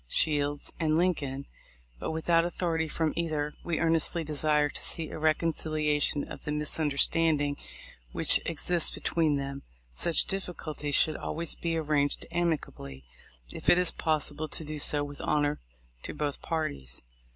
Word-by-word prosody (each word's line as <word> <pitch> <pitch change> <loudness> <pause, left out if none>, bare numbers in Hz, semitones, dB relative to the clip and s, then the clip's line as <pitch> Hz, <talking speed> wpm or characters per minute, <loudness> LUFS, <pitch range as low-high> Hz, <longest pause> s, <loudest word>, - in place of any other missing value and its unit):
Shields 145 - +1
and 155 -1 +2
Lincoln, 140 -6 0 0.5
but - - -3
with 160 0 -4
out 165 -1 +5
authority 170 -2 -1
from 155 0 -1
either, 155 -3 -1
we 170 -2 -1
earnestly 165 0 +2
desire 150 0 +2
to - - -5
see 160 -2 +1
a - - -6
reconciliation 155 -2 +1
of - - -9
the 150 - -3
misunderstanding 150 0 +2 0.6
which - - +4
exists 170 +1 0
be - - -8
tween 160 -3 +2
them. 140 0 -4 0.3
Such 155 - +2
difficulties 155 -6 -3
should 155 - +3
always 170 0 -2
be 165 -1 -1
arranged 150 -2 0
amicably, 145 - -2 0.5
if - - -2
it 175 - +7
is 180 -1 +3
possible 155 -1 -1
to 160 - -1
do 155 0 -4
so 145 0 +4
with 145 0 -7
honor 145 0 +1 0.4
to - - -6
both 145 -2 -2
parties. 70 - -3
155 Hz, 150 wpm, -29 LUFS, 145-165 Hz, 0.6 s, it